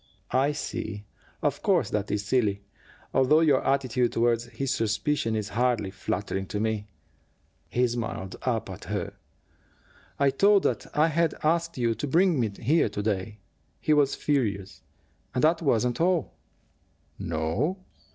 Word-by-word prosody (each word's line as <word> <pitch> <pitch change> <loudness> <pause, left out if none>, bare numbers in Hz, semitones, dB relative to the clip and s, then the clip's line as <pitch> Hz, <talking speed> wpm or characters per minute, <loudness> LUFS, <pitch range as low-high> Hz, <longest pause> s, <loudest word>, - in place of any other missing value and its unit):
"I 135 +3 +3
see. 110 -7 -5 0.4
Of - - 0
course - - +2
that 105 -1 -1
is 105 0 -1
silly, 105 -4 +1 0.5
although 150 +5 +4
your 145 -5 +3
attitude 130 -3 +1
toward 115 0 +2
his 130 +2 -3
suspicion 115 +2 0
is 105 -1 -2
hardly 115 -3 0
flattering 95 0 -3
to 105 - -3
me." 110 -1 -1 0.8
He 125 +1 +2
smiled 115 -5 -4
up 115 -4 -1
at - - -9
her. - - -3 1.0
"I 140 -1 +3
told 200 +8 +4
him - - +5
that - - -14
I 155 +2 +5
had 165 +1 +1
asked 165 +1 +1
you 120 -2 +1
to 115 +7 -4
bring 170 +1 +3
me 115 -3 +1
here 120 +8 +1
to 105 0 -4
day. 105 0 -2 0.4
He 155 - +2
was 145 -2 +3
furious. 105 -9 -1 0.5
And 125 - 0
that 165 +2 +4
wasn't 125 -3 +1
all." 175 -3 +1 0.9
"No?" 85 - -1
120 Hz, 150 wpm, -27 LUFS, 105-145 Hz, 1.0 s, him